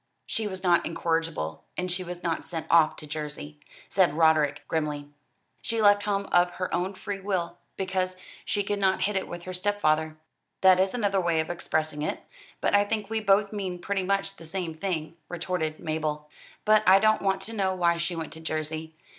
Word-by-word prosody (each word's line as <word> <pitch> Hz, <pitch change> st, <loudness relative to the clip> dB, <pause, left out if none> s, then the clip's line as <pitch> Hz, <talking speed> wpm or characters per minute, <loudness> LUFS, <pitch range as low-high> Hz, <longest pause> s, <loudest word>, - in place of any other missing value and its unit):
"She 220 Hz, -1 st, -2 dB
was 190 Hz, -1 st, -6 dB
not 175 Hz, -2 st, +4 dB
incorrigible, 165 Hz, -, -2 dB
and 180 Hz, 0 st, -1 dB
she 180 Hz, +1 st, -1 dB
was 175 Hz, 0 st, -7 dB
not 165 Hz, -2 st, -1 dB
sent 165 Hz, -2 st, -5 dB
off 165 Hz, -2 st, +5 dB
to -, -, -7 dB
Jersey," 150 Hz, 0 st, -6 dB, 0.3 s
said 180 Hz, -6 st, +3 dB
Roderick 160 Hz, -2 st, +3 dB
grimly. 150 Hz, -2 st, -2 dB, 0.5 s
"She 230 Hz, -1 st, -2 dB
left 205 Hz, -1 st, +6 dB
home 200 Hz, -1 st, -1 dB
of 175 Hz, 0 st, +5 dB
her 185 Hz, 0 st, -3 dB
own 185 Hz, +3 st, -1 dB
free 205 Hz, 0 st, -5 dB
will; 180 Hz, -3 st, -2 dB, 0.2 s
because 185 Hz, -1 st, -1 dB, 0.3 s
she 205 Hz, -, 0 dB
could 205 Hz, +1 st, -1 dB
not 190 Hz, -1 st, +2 dB
hit 205 Hz, 0 st, 0 dB
it 190 Hz, -, -1 dB
with 175 Hz, 0 st, -7 dB
her 185 Hz, -, -6 dB
stepfather." 160 Hz, -5 st, +1 dB, 0.4 s
"That 185 Hz, -1 st, +7 dB
is 190 Hz, +4 st, +2 dB
another 200 Hz, -5 st, +1 dB
way 170 Hz, -2 st, +1 dB
of 160 Hz, +2 st, -1 dB
expressing 155 Hz, -3 st, -2 dB
it, 155 Hz, -, -2 dB, 0.4 s
but -, -, +3 dB
I 205 Hz, -, +6 dB
think 210 Hz, 0 st, -3 dB
we 225 Hz, -, +1 dB
both 205 Hz, 0 st, +3 dB
mean 190 Hz, -4 st, -3 dB
pretty 195 Hz, +2 st, -2 dB
much 195 Hz, +1 st, 0 dB
the 165 Hz, -, -11 dB
same 175 Hz, -1 st, -3 dB
thing," 160 Hz, -1 st, -3 dB
retorted 175 Hz, -3 st, -2 dB
Mabel. 155 Hz, -2 st, -2 dB, 0.4 s
"But 215 Hz, 0 st, +6 dB
I 190 Hz, +1 st, +9 dB
don't 215 Hz, +2 st, +3 dB
want 195 Hz, -1 st, +1 dB
to 220 Hz, +4 st, -4 dB
know 190 Hz, -3 st, 0 dB
why 170 Hz, -2 st, +2 dB
she 170 Hz, +1 st, -1 dB
went 165 Hz, -2 st, -5 dB
to 160 Hz, -, -8 dB
Jersey. 160 Hz, 0 st, -4 dB
180 Hz, 195 wpm, -27 LUFS, 160-195 Hz, 0.5 s, I